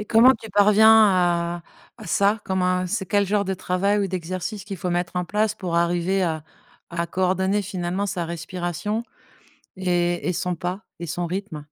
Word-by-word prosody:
Et - - -4
comment 230 +4 +6
tu 225 - -9
parviens 210 +2 +6
à 175 -2 +1 0.4
à - - -9
ça? 200 +5 +2
Comme 190 -1 -1
un 180 0 +1
c'est 180 - -2
quel 200 +2 +2
genre 200 +1 +1
de 190 0 -2
travail 190 +3 0
ou 200 - +1
d'exercice 185 +2 -4
qu'il 200 -1 -6
faut 180 0 -3
mettre 175 0 -2
en 180 - 0
place 210 +4 0
pour 180 -3 -4
arriver 175 +3 +1
à 160 -3 -2 0.5
à 170 0 -2
coordonner, 190 +2 +1
finalement, 185 +1 -3
sa 185 -3 -2
respiration 175 +5 -3 0.7
et 175 -2 0
et - - 0
son 180 +1 -2
pas 180 +4 -4 0.2
et 170 - -5
son 175 +2 -2
rythme? 185 0 -4
185 Hz, 185 wpm, -23 LUFS, 175-200 Hz, 0.7 s, comment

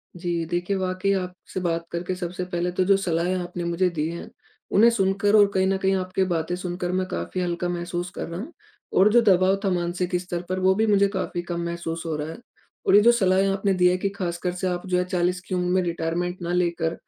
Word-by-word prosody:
जी, 170 -2 -2
देखिए 175 +4 -1
वाक़ई 185 +1 -1
आपसे 185 0 -4
बात 170 -2 -1
करके 175 +2 -3
सबसे 180 0 -4
पहले 175 0 -1
तो 185 +1 +1
जो 195 0 +5
सलाहें 180 -1 0
आपने 175 -1 -4
मुझे 170 +2 +1
दी 150 +1 0
हैं, 170 - -7 0.4
उन्हें 225 +4 +6
सुनकर 200 -1 +2
और 205 -1 +7
कहीं 190 0 +2
न 195 0 +1
कहीं 190 0 +1
आपकी 185 0 -1
बातें 170 -1 -1
सुनकर 180 0 -3
मैं 185 0 -1
काफ़ी 185 - -3
हल्का 175 0 -2
महसूस 175 0 -3
कर - - -4
रहा 170 +1 -6
हूँ 280 - -7 0.4
और 195 +3 +6
जो 240 - +7
दबाव 190 -2 +4
था 195 - +3
मानसिक 175 +1 -1
स्तर 175 -1 -4
पर 185 0 -1
वो 190 0 +4
भी 220 +2 +2
मुझे 200 -1 +4
काफ़ी 180 -2 -2
कम 170 0 -4
महसूस 170 -1 -4
हो 160 -2 -2
रहा 150 +1 -4
है। 165 - -7 0.5
और 195 - +6
ये 205 - +8
जो 235 +3 +7
सलाहें 190 -4 +3
आपने 195 0 +1
दी 180 -1 +4
हैं 180 +1 +3
कि 200 - 0
खासकर 180 -2 -3
से 180 +1 -2
आप 180 0 -2
जो 180 -1 +1
है 180 - +2
40 180 0 0
की 185 - -2
उम्र 180 0 0
में 185 - +3
रिटायरमेंट 175 +1 -2
ना 170 0 -3
लेकर, 170 -2 0
180 Hz, 235 wpm, -24 LUFS, 175-190 Hz, 0.5 s, ये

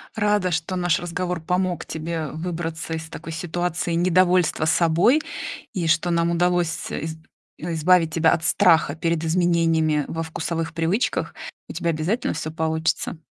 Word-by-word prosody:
Рада, 210 -4 +1
что 160 +3 -1
наш 175 -2 +1
разговор 180 0 -3
помог 180 +1 -1
тебе 160 0 -4
выбраться 165 0 -4
из 160 0 -5
такой 165 +1 -8
ситуации 175 +1 -2
недовольства 180 -1 +3
собой. 170 - +4 0.5
И, 175 -3 -1
что 165 +2 +2
нам 170 0 +2
удалось 175 0 +2
с 155 -1 -5
из 160 +1 -4 0.4
избавить 165 0 +2
тебя 165 0 +4
от 165 - 0
страха 160 -3 +4
перед 165 0 0
изменениями 165 -3 +2
во 165 0 -3
вкусовых 165 0 -3
привычках. 170 +8 0 0.3
У - - -8
тебя 170 - -1
обязательно 170 +10 -1
всё 155 0 -4
получится! 160 0 -1
165 Hz, 145 wpm, -23 LUFS, 160-175 Hz, 0.5 s, собой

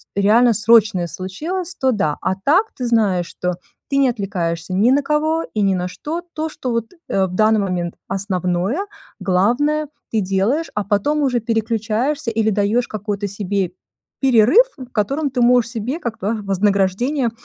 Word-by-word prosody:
реально 225 +4 +4
срочное 215 -3 +4
случилось, 325 - -5
то- 265 -5 +1
да. 155 -10 0
А 190 - 0
так, 370 +10 +3
ты 250 - -3
знаешь, 200 -7 +2
что 180 0 -3 0.4
ты 275 - 0
не 275 -1 +4
отвлекаешься 185 -7 -2
ни 205 +6 +3
на 275 +3 +4
кого 310 +3 +1
и 215 - 0
ни 195 -1 +3
на 180 0 -2
что. 315 - -5
То, 315 0 -2
что 260 -5 -5
вот, 230 -1 -2 0.2
э, 195 -1 +2
в 180 -1 -6
данный 215 +2 +4
момент 180 -3 -2
основное, 190 - -1 0.3
главное 260 +11 +1 0.2
ты 220 - +1
делаешь, 195 - 0
а, 210 -1 -1
потом 210 +10 +1
уже 250 -4 +1
переключаешься 230 +4 -1
или 220 -1 +1
даёшь 210 +4 +1
какой-то 205 -1 -3
себе 200 -2 -2 0.5
перерыв, 260 - +5
в 255 -2 -10
котором 275 +8 0
ты 255 -1 -2
можешь 240 -1 +4
себе 245 +7 -3
как 230 -6 -5
бы 215 +3 -2
вознаграждение 200 +6 +1
220 Hz, 165 wpm, -19 LUFS, 195-260 Hz, 0.5 s, перерыв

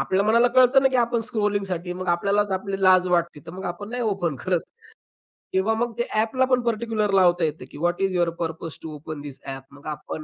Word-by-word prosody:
आपल्या 190 +8 +1
मनाला 235 +3 +4
कळतं 255 +1 +6
ना 270 - +5
की 260 - 0
आपण 235 -1 +2
स्क्रॉलिंगसाठी 200 -6 -1
मग 185 0 -6
आपल्यालाच 200 +4 +1
आपली 195 +1 -3
लाज 185 -1 +5
वाटते. 170 -4 0
तर - - -7
मग 190 +1 -8
आपण 175 +4 -5
नाही 245 0 -3
ओपन 190 - -1
करत 180 -2 +1 0.9
किंवा 190 +4 +2
मग 240 +1 0
ते 240 - +1
ॲपला 225 +4 +2
पण 255 -1 +3
पार्टिक्युलर 225 -2 0
लावता 180 -2 +4
येतं 155 0 -4
की, - - -10
"what 175 +3 0
is 195 -1 +1
your 175 -1 +2
purpose 165 -1 -4
to 160 -1 -6
open 150 0 -7
this 145 -2 -9
app." 135 0 -6
मग 140 0 -16
आपण 150 +1 -6
190 Hz, 215 wpm, -24 LUFS, 170-220 Hz, 0.9 s, कळतं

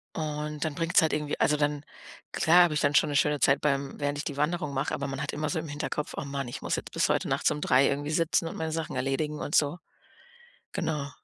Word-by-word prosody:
Und 150 -1 -3
dann 155 - -2
bringt's 165 +3 +3
halt 160 - +1
irgendwie 150 -1 -2
also, 150 - +3
dann 145 0 0 0.5
klar 175 +3 +5
habe 170 -3 +1
ich 150 - +1
dann 145 0 +2
schon - - +4
'ne 145 - -2
schöne 150 +1 +2
Zeit 135 +1 +3
beim 140 -1 -1
während 145 0 -1
ich 145 - -3
die 145 -2 -5
Wanderung 150 -1 -1
mache, 135 +2 -1
aber 140 0 -2
man 135 0 -4
hat 140 - -2
immer 150 +1 -2
so 170 - -1
im 160 - -6
Hinterkopf: 150 0 -4
„Oh - - -3
man 140 -1 -4
ich 120 - -7
muss - - -1
jetzt - - -6
bis - - +1
heute - - +1
nachts - - +1
um 150 0 -3
03:00 130 +1 +4
irgendwie 145 +2 -2
sitzen 165 +1 +1
und - - -6
meine 160 0 -2
Sachen 160 +1 -3
erledigen 150 +3 -1
und 145 - -2
so.“ 150 +3 +3 0.9
Genau. 150 -3 -2
150 Hz, 250 wpm, -28 LUFS, 140-155 Hz, 0.9 s, klar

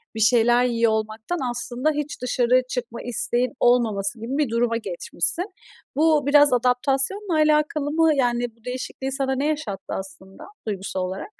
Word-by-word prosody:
bir - - -4
şeyler 240 +2 +4
yiyor 230 -2 +2
olmaktan 220 +9 -3
aslında 245 +4 -1
hiç 295 -3 -4
dışarı 250 0 +2
çıkma 235 -2 -4
isteğinin 245 +1 -1
olmaması 225 -3 +2
gibi 245 +6 -4
bir 295 -6 +1
duruma 230 0 +1
geçmişsin. 360 - -2 0.5
Bu 310 -1 +3
biraz 290 -2 +6
adaptasyonla 270 - +1
alakalı 305 -1 +2
mı? 320 -1 +3
Yani, 240 -3 0
bu 230 +1 -29
değişikliği 255 +1 -5
sana 265 -1 -1
ne 280 +3 -1
yaşattı 290 -11 -3
aslında 190 0 -8 0.2
duygusal 190 -2 -3
olarak? 190 - -7
250 Hz, 145 wpm, -23 LUFS, 230-295 Hz, 0.5 s, biraz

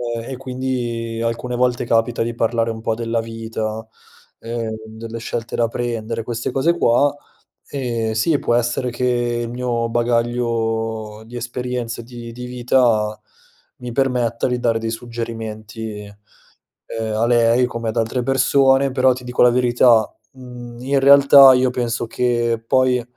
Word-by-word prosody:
ehm, 115 - -5
e 130 - -5
quindi 125 -3 -3
alcune 115 +2 -2
volte 125 0 +1
capita 115 0 +1
di 115 +1 -2
parlare 115 0 0
un 110 0 -5
po' 115 - 0
della 115 0 -2
vita, 110 -1 -5 0.5
ehm, 115 -1 -4
delle 110 +1 -8
scelte 115 0 -4
da 115 - +2
prendere, 115 -1 -3
queste 120 +2 -4
cose 165 +7 +1
qua, 140 +1 +3 0.6
ehm, 120 -5 -2
sì 115 +8 +1
può 120 - +1
essere 120 +1 0
che 125 +1 -2 0.4
il - - -6
mio 120 -1 -2
bagaglio 115 -2 -1
di 120 +2 -8
esperienza 120 -1 -4
di 120 0 -10
di 125 +1 -7
vita 120 -3 +1 0.6
mi 125 -1 -7
permetta 125 -3 0
di 125 -1 -1
dare 115 -2 +1
dei 115 0 -3
suggerimenti, 115 -2 -6 0.9
ehm, 110 -1 -3
a 110 +2 +1
lei 120 +1 +3
come 115 -2 -5
ad 110 - -2
altre 115 +3 0
persone, 135 +1 +3
però 130 0 +3
ti 125 0 -9
dico 125 0 -2
la 125 - +7
verità, 120 -2 +4 0.2
mhmm, 125 -2 -10
in 135 +2 +1
realtà 140 0 +8
io 130 0 +3
penso 120 -2 -2
che 120 -1 0
poi 130 0 +2
120 Hz, 150 wpm, -20 LUFS, 115-125 Hz, 0.9 s, realtà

